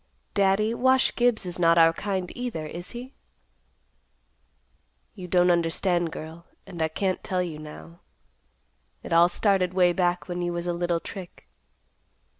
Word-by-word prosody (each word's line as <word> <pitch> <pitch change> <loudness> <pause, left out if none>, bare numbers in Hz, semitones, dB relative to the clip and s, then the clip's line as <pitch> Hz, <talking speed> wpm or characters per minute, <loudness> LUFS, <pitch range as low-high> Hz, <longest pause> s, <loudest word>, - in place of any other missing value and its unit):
Daddy, 200 +2 +2
Wash 260 +2 +3
Gibbs 240 -5 +2
is 180 0 -2
not 170 -1 +4
our 165 0 +6
kind 190 -1 -3
either, 245 -11 -4
is 175 +3 -7
he?" 250 +3 -8 2.0
"You 180 - -9
don't 180 0 +4
understand, 170 0 +1
girl, 160 +2 -9 0.2
and 175 -4 -8
I 160 - +2
can't 185 +4 -2
tell 185 -1 -1
you 160 -4 -6
now. 155 +2 -11 1.0
It - - -4
all 170 +1 +6
started 185 -1 +1
way 180 -2 +4
back 175 -1 0
when 175 -1 -4
you 175 0 -2
was 170 0 -4
a 175 - -1
little 170 0 -1
trick." 180 +1 -10
175 Hz, 150 wpm, -26 LUFS, 170-195 Hz, 2.0 s, our